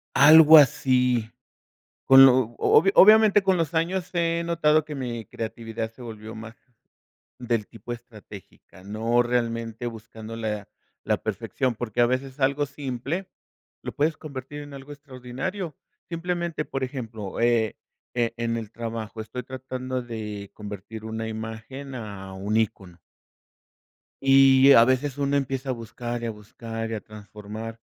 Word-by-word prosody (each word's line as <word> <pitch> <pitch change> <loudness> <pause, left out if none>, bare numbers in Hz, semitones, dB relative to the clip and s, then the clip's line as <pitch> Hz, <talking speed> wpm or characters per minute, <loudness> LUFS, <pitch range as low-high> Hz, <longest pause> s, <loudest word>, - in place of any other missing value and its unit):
Algo 155 +1 +9
así. 125 -4 +3 0.8
Con 135 0 +9
lo 130 - +7 0.2
obvio 195 +5 +4
obviamente, 215 0 +7
con 190 -1 +3
los 165 0 -1
años 175 +2 -1
he 170 -1 0
notado 155 -2 +2
que 150 - -8
mi 120 -5 -5
creatividad 115 0 -5
se 125 - -15
volvió 110 -1 -9
más 115 +1 -9 0.8
del 120 -4 -2
tipo 115 +1 -8
estratégica, 105 -5 -14
no 110 +4 +1
realmente 115 -1 -2
buscando 115 -1 -8
la 105 -3 -4 0.4
la - - +1
perfección, 130 -2 -2
porque 120 0 -5
a - - +6
veces 130 +2 -3
algo 140 +2 +1
simple 140 +6 -4 0.6
lo - - -4
puedes 155 +2 0
convertir 145 0 -8
en 145 -1 -11
algo 135 +2 -11
extraordinario. 140 +5 -6 0.3
Simplemente, 170 -2 -3
por 135 - -4
ejemplo, 115 -7 -6
eh, 115 -2 +2 0.4
e 120 -2 0
en 115 0 -1
el 110 -2 -7
trabajo 115 -1 -6
estoy 115 +3 -6
tratando 130 0 -5
de 105 -4 -7
convertir 105 +1 -8
una 110 0 -4
imagen 115 +5 -7
a 100 -4 -8
un 100 +3 -3
ícono. 95 -5 -2 1.3
Y, 135 0 +7
a 115 - +8
veces, 130 +2 0
uno 140 0 +1
empieza 135 -1 -2
a - - +1
buscar 120 0 -6
y 115 - -2
a - - -2
buscar 115 +1 -7
y - - -1
a 110 - -4
transformar, 105 +2 -9
120 Hz, 145 wpm, -25 LUFS, 110-140 Hz, 1.3 s, Algo